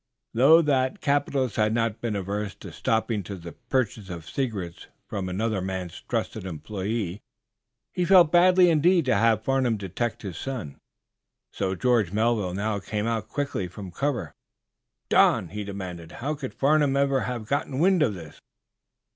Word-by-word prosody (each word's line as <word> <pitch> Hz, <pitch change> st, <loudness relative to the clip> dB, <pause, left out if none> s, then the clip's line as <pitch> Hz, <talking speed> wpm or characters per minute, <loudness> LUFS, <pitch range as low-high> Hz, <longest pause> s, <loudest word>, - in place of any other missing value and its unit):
Though 150 Hz, +8 st, +6 dB
that 130 Hz, -3 st, +1 dB
capitalist 140 Hz, -4 st, 0 dB
had 110 Hz, 0 st, +2 dB
not 115 Hz, -2 st, -1 dB
been 115 Hz, -3 st, -2 dB
averse 100 Hz, +1 st, -3 dB
to -, -, -10 dB
stooping 110 Hz, -2 st, 0 dB
to 100 Hz, +2 st, -7 dB
the 85 Hz, -2 st, -9 dB
purchase 110 Hz, -5 st, -2 dB
of 85 Hz, -3 st, -7 dB
secrets 100 Hz, -8 st, -4 dB, 0.2 s
from 95 Hz, -2 st, -4 dB
another 105 Hz, +1 st, -1 dB
man's 95 Hz, -2 st, -5 dB
trusted -, -, -2 dB
employe, 95 Hz, +3 st, -4 dB, 0.7 s
he 180 Hz, -, 0 dB
felt 175 Hz, -4 st, +6 dB
badly 180 Hz, 0 st, +6 dB
indeed 165 Hz, +1 st, +3 dB
to 130 Hz, -, +3 dB
have 115 Hz, -2 st, +3 dB
Farnum 130 Hz, -3 st, +1 dB
detect 100 Hz, +5 st, -3 dB
his 95 Hz, -5 st, -6 dB
son. 120 Hz, -, -5 dB, 0.7 s
So 95 Hz, -1 st, -1 dB
George 115 Hz, -4 st, +2 dB
Melville 105 Hz, -4 st, +1 dB
now 105 Hz, +1 st, -1 dB
came 105 Hz, +1 st, -3 dB
out 115 Hz, -4 st, -1 dB
quickly 140 Hz, -10 st, -2 dB
from 95 Hz, +1 st, -9 dB
cover. 120 Hz, -, -2 dB, 0.8 s
"Don," 90 Hz, -, +4 dB
he 105 Hz, +3 st, -5 dB
demanded, 95 Hz, -4 st, -7 dB
"how 145 Hz, +5 st, -3 dB
could 140 Hz, -3 st, -6 dB
Farnum 145 Hz, -1 st, +3 dB
ever 140 Hz, -1 st, +2 dB
have 125 Hz, -3 st, -4 dB
gotten 140 Hz, +2 st, -2 dB
wind 180 Hz, +3 st, +3 dB
of 115 Hz, -9 st, +2 dB
this?" 80 Hz, -4 st, -11 dB
110 Hz, 155 wpm, -26 LUFS, 95-135 Hz, 0.8 s, Though